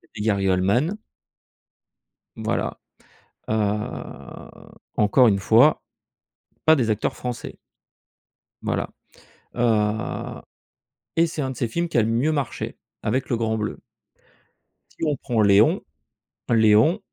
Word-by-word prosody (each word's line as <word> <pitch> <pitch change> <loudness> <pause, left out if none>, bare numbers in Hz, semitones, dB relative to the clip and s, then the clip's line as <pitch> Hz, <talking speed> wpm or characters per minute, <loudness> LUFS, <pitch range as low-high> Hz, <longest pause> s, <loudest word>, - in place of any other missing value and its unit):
Gary 100 -2 0
Oldman. 105 - +1 1.4
Voilà, - - -2 0.7
heu, 105 -1 -3 0.5
encore 110 +4 +5
une 100 -2 +2
fois, 115 +9 +4 0.8
pas 160 0 +6
des 120 -5 0
acteurs 110 0 0
français. 125 -1 -6 1.1
Voilà, - - -2 0.7
heu 110 -2 0 0.7
et 165 - +4
c'est 160 -2 -4
un 135 - -2
de 130 - -8
ses 120 - 0
films 170 +9 -2
qui 160 - -1
a 115 - +5
le - - 0
mieux 125 +7 +1
marché, 140 -5 -3 0.2
avec 130 0 -1
Le 120 - +1
Grand 110 -1 -1
Bleu. 105 -1 -4 1.2
Si - - 0
on 150 - +1
prend 120 -3 -1
Léon. 100 0 +5 0.7
Léon, 110 - +4
115 Hz, 115 wpm, -23 LUFS, 105-135 Hz, 1.4 s, pas